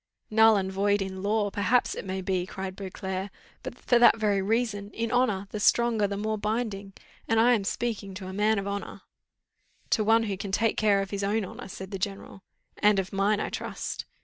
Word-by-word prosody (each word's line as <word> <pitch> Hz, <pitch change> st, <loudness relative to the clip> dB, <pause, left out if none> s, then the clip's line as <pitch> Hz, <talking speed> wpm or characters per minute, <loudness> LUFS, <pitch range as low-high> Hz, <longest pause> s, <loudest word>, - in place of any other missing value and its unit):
"Null 220 Hz, 0 st, +6 dB
and 190 Hz, -1 st, -2 dB
void 200 Hz, +1 st, +1 dB
in 190 Hz, -1 st, -4 dB
law, 205 Hz, 0 st, 0 dB
perhaps 230 Hz, +5 st, +2 dB
it -, -, -6 dB
may 190 Hz, 0 st, -3 dB
be," 185 Hz, -1 st, -1 dB
cried 190 Hz, -1 st, -6 dB
Beauclerc; 190 Hz, 0 st, -5 dB, 0.3 s
"but -, -, -7 dB
for 245 Hz, -, +2 dB
that 235 Hz, -1 st, +7 dB
very 205 Hz, -3 st, +1 dB
reason, 210 Hz, -1 st, -1 dB
in 230 Hz, 0 st, -2 dB
honour, 245 Hz, -6 st, +1 dB
the 210 Hz, -, -4 dB
stronger 225 Hz, -1 st, +3 dB
the 200 Hz, 0 st, -4 dB
more 215 Hz, +1 st, -2 dB
binding, 210 Hz, -2 st, -3 dB, 0.3 s
and 225 Hz, -1 st, +2 dB
I 240 Hz, +2 st, +5 dB
am 215 Hz, -4 st, +1 dB
speaking 200 Hz, -2 st, -3 dB
to 185 Hz, 0 st, -7 dB
a 190 Hz, -, -6 dB
man 210 Hz, +2 st, +2 dB
of 200 Hz, 0 st, -3 dB
honour." 200 Hz, 0 st, -5 dB, 0.9 s
"To 220 Hz, -, +3 dB
one 225 Hz, +2 st, +4 dB
who 200 Hz, -3 st, -3 dB
can 195 Hz, 0 st, -5 dB
take 225 Hz, +3 st, +1 dB
care 205 Hz, -2 st, +3 dB
of 195 Hz, -, -9 dB
his 200 Hz, -1 st, -3 dB
own 205 Hz, +1 st, 0 dB
honour," -, -, -9 dB
said 190 Hz, 0 st, -8 dB
the 195 Hz, -, -4 dB
general. 195 Hz, 0 st, -5 dB, 0.4 s
"And 210 Hz, -1 st, +4 dB
of 195 Hz, 0 st, -2 dB
mine, 200 Hz, +2 st, +2 dB
I -, -, -2 dB
trust." -, -, -5 dB
205 Hz, 210 wpm, -27 LUFS, 195-220 Hz, 0.9 s, that